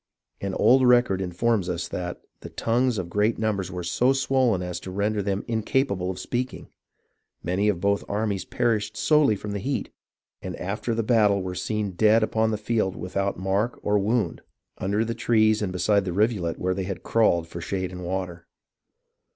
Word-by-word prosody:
An 100 -1 -3
old 130 0 +5
record 120 -6 +4
informs 95 +2 0
us 85 - -2
that 90 -1 -5 0.2
"the - - -9
tongues 120 +1 0
of 90 -3 -3
great 105 +5 +1
numbers 100 -4 -1
were 90 -2 -5
so 125 +10 +2
swollen 130 -7 +1
as 90 -1 -4
to - - -9
render 100 +2 0
them 100 0 -2
incapable 110 -4 0
of 95 - -4
speaking. 125 +7 -4 0.7
Many 95 +4 +1
of 95 -5 0
both 100 +2 +1
armies 100 -2 -1
perished 115 -2 -1
solely 150 -8 +4
from 100 +1 -6
heat, 130 +7 -3 0.5
and - - -5
after 105 +5 -3
the 115 - 0
battle 105 -4 +3
were 90 0 -4
seen 105 +1 -2
dead 110 +4 +4
upon 110 0 +1
the 110 - -1
field 105 -3 -1
without 100 +3 -2
mark 95 +6 -1
or 105 0 +2
wound, 105 -3 0 0.4
under 100 +4 0
the 115 - -2
trees 110 -2 +2
and 100 -3 -1
beside 100 +2 +2
the 90 -2 -3
rivulet 100 -4 +1
where 95 +1 0
they 95 0 -3
had 95 -1 -5
crawled 85 -7 +2
for 85 +1 -7
shade 95 +1 -3
and 90 0 -7
water. 90 -2 -4
100 Hz, 180 wpm, -25 LUFS, 95-115 Hz, 0.7 s, old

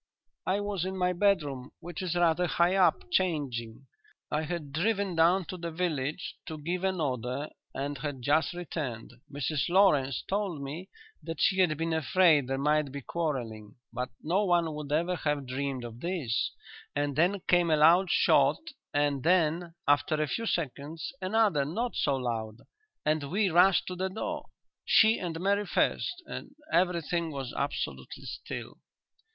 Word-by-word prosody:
"I 195 +2 +1
was 205 -4 -2
in 190 +1 -3
my 180 0 +1
bedroom, 150 -9 0
which 175 0 -7
is 180 -2 -2
rather 175 0 +3
high 175 +2 +2
up, 190 -2 +4
changing. 135 - -1 0.5
I 150 - +1
had 160 -2 -4
driven 200 +3 0
down 175 +3 +4
to 185 - -6
the 170 -1 -4
village, 160 -2 -2
to 160 -2 -5
give 175 +5 -3
an 190 -2 0
order, 130 0 -2 0.2
and 140 0 -3
had 140 -3 -5
just 155 +6 +2
returned. 145 -10 -5 0.2
Mrs 145 +2 -1
Lawrence 150 -9 +3
told 195 -5 -1
me 160 +8 -6 0.3
that 165 -2 -6
she 190 -1 +3
had 170 -5 +3
been 165 +1 -1
afraid 160 -2 +4
there 135 0 -1
might 150 0 +1
be 140 +1 -6
quarrelling, 120 -10 -4 0.2
but 125 +1 -3
no 180 +7 +2
one 170 -4 +2
would 150 -1 -6
ever 170 +4 +1
have 150 -3 -1
dreamed 130 0 -3
of 120 0 -8
this, 160 -8 -1 0.4
and 145 -1 0
then 180 +6 +2
came 175 -1 +4
a 155 - +4
loud 170 +5 +6
shot - - +4 0.4
and 145 -2 +1
then, 170 +1 +2
after 145 +2 +3
a 155 - +2
few 230 +9 -2
seconds, 155 - -3
another 195 -6 +2
not 225 - -2
so 140 - +1
loud, 115 -3 -3 0.4
and 155 -2 0
we 195 +1 +1
rushed 180 +3 +5
to 185 - -5
the 190 +1 -1
door 190 - -4 0.4
she 220 +1 +5
and 165 -3 -4
Mary 200 +2 +1
first 355 - 0
and 280 -2 -8 0.2
everything 170 -2 +1
was 135 -3 -5
absolutely 140 +1 -4
still." - - -7
160 Hz, 160 wpm, -29 LUFS, 140-180 Hz, 0.5 s, loud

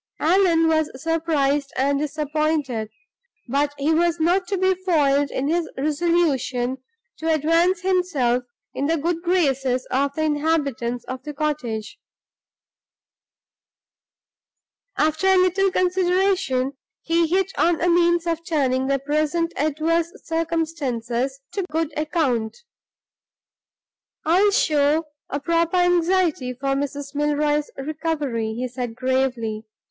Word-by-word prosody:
Allan 335 -1 +3
was 315 -1 +2
surprised 295 -3 0
and 280 +1 +1
disappointed; 300 -5 -1 0.6
but 280 +3 +1
he 290 +3 +1
was 340 +1 +2
not 355 +3 +2
to 395 - -1
be 375 +1 +3
foiled 290 -7 +1
in 265 +2 -2
his 335 +2 0
resolution 280 -5 0 0.4
to 320 0 0
advance 330 +4 +2
himself 345 -10 +1 0.3
in 280 - -1
the 330 +1 +1
good 335 +2 -1
graces 270 -8 +1
of 280 +2 0
the 315 - -1
inhabitants 290 -6 -1
of 255 0 -6
the 295 -1 -8
cottage. 280 -8 -3 3.0
After 315 +5 +1
a 380 0 +5
little 370 +2 +3
consideration 365 -7 +1 0.3
he 335 0 +2
hit 380 +3 +1
on 340 -1 +2
a 350 - +1
means 345 0 +3
of 335 -1 -2
turning 265 -6 0
the 275 0 +2
present 305 +4 -1
adverse 320 +3 0
circumstances 275 -6 -2
to 400 - -2
good 320 -1 -2
account. 290 -8 -1 1.7
"I'll 365 +6 +4
show 305 -6 +2 0.2
a 285 - -2
proper 335 +3 +1
anxiety 355 -6 +2
for 270 +2 -4
Mrs. 280 +1 -3
Milroy's 295 0 0
recovery," 280 -6 -2
he 250 +2 -2
said, 245 -2 -5
gravely. 250 -4 -1
305 Hz, 115 wpm, -22 LUFS, 275-335 Hz, 3.0 s, a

